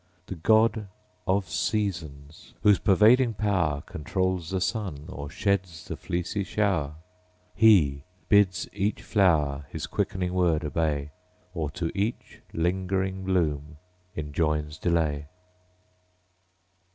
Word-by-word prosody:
The -, -, -6 dB
GOD 110 Hz, +4 st, +3 dB, 0.4 s
of 95 Hz, 0 st, +1 dB
SEASONS; 80 Hz, -7 st, -3 dB
whose 105 Hz, -2 st, +5 dB
pervading 110 Hz, +4 st, +4 dB
power 90 Hz, -9 st, 0 dB
Controls 95 Hz, +2 st, -2 dB
the 95 Hz, -, -1 dB
sun, 90 Hz, -8 st, -3 dB
or 70 Hz, -5 st, -6 dB
sheds 95 Hz, -3 st, -1 dB
the -, -, -5 dB
fleecy 90 Hz, +3 st, -3 dB
shower: 90 Hz, -8 st, 0 dB, 0.6 s
He 80 Hz, -11 st, +4 dB, 0.2 s
bids 100 Hz, -4 st, +3 dB
each 100 Hz, +2 st, -1 dB
flower 75 Hz, -9 st, +2 dB
His -, -, -5 dB
quickening 90 Hz, -1 st, -2 dB
word 85 Hz, -3 st, +2 dB
obey; 75 Hz, -2 st, -1 dB, 0.4 s
Or 80 Hz, -5 st, -2 dB
to 85 Hz, -2 st, -1 dB
each 105 Hz, +4 st, -3 dB
lingering 95 Hz, +2 st, -1 dB
bloom 75 Hz, -5 st, -1 dB, 0.4 s
enjoins 75 Hz, 0 st, -2 dB
delay. 75 Hz, -4 st, 0 dB
90 Hz, 105 wpm, -27 LUFS, 75-100 Hz, 0.6 s, whose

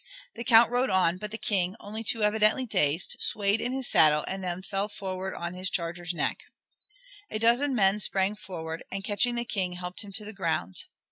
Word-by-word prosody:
The 235 Hz, -, -6 dB
Count 235 Hz, -1 st, +6 dB
rode 250 Hz, +2 st, +1 dB
on, 185 Hz, -2 st, +2 dB
but 210 Hz, +3 st, -6 dB
the 220 Hz, -, -6 dB
King, 190 Hz, -5 st, 0 dB
only 215 Hz, +2 st, -5 dB
too 225 Hz, 0 st, +2 dB
evidently 215 Hz, +4 st, +3 dB
dazed, 175 Hz, -7 st, 0 dB
swayed 205 Hz, +1 st, +1 dB
in 245 Hz, -, -2 dB
his 265 Hz, -1 st, 0 dB
saddle, 150 Hz, -1 st, +5 dB
and 190 Hz, 0 st, -4 dB
then 180 Hz, 0 st, -4 dB
fell 195 Hz, +1 st, 0 dB
forward 190 Hz, -2 st, -5 dB
on 170 Hz, +1 st, -4 dB
his 185 Hz, 0 st, -3 dB
charger's 175 Hz, 0 st, -2 dB
neck. 175 Hz, -, -1 dB, 0.9 s
A -, -, -3 dB
dozen 240 Hz, +5 st, +3 dB
men 200 Hz, -2 st, +3 dB
sprang 195 Hz, 0 st, +1 dB
forward, 165 Hz, -5 st, -7 dB
and 195 Hz, 0 st, -4 dB
catching 215 Hz, +5 st, +1 dB
the 235 Hz, 0 st, -2 dB
King, 190 Hz, -6 st, -2 dB
helped 180 Hz, 0 st, -3 dB
him 205 Hz, -2 st, -8 dB
to 210 Hz, +1 st, -3 dB
the 215 Hz, -, -6 dB
ground. 160 Hz, -, -2 dB
195 Hz, 200 wpm, -27 LUFS, 180-220 Hz, 0.9 s, Count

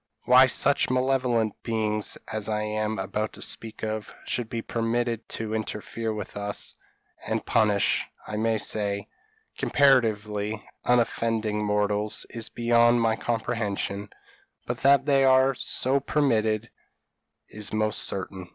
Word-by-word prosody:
Why 130 Hz, +1 st, +7 dB
such 140 Hz, +2 st, +2 dB
malevolent 125 Hz, -4 st, +1 dB
beings 110 Hz, -2 st, -1 dB, 0.2 s
as 110 Hz, -1 st, -2 dB
I 105 Hz, 0 st, -1 dB
am 110 Hz, 0 st, -2 dB
about 105 Hz, +3 st, -3 dB
to -, -, -6 dB
speak 110 Hz, -1 st, -4 dB
of, 110 Hz, -1 st, -4 dB
should 120 Hz, -3 st, -2 dB
be 115 Hz, -1 st, -4 dB
permitted 115 Hz, 0 st, -2 dB
to 110 Hz, -1 st, -4 dB
interfere 110 Hz, +1 st, -3 dB
with 105 Hz, -2 st, -6 dB
us, 100 Hz, 0 st, -1 dB, 0.5 s
and -, -, -2 dB
punish, 105 Hz, -3 st, +2 dB, 0.2 s
I 105 Hz, -, -5 dB
may 110 Hz, +1 st, +1 dB
say, 100 Hz, -1 st, -1 dB, 0.5 s
comparatively 110 Hz, -6 st, +2 dB, 0.2 s
unoffending 115 Hz, -3 st, +1 dB
mortals, 105 Hz, 0 st, 0 dB
is 115 Hz, -1 st, -3 dB
beyond 120 Hz, 0 st, +3 dB
my 115 Hz, -1 st, +2 dB
comprehension; 110 Hz, -4 st, -2 dB, 0.6 s
but -, -, -3 dB
that 140 Hz, 0 st, +4 dB
they 140 Hz, -2 st, +4 dB
are 130 Hz, 0 st, +5 dB
so 130 Hz, +2 st, +1 dB
permitted 115 Hz, -6 st, 0 dB, 0.8 s
is 105 Hz, -1 st, -3 dB
most 110 Hz, 0 st, 0 dB
certain." 95 Hz, -1 st, -3 dB
110 Hz, 125 wpm, -26 LUFS, 105-120 Hz, 0.8 s, Why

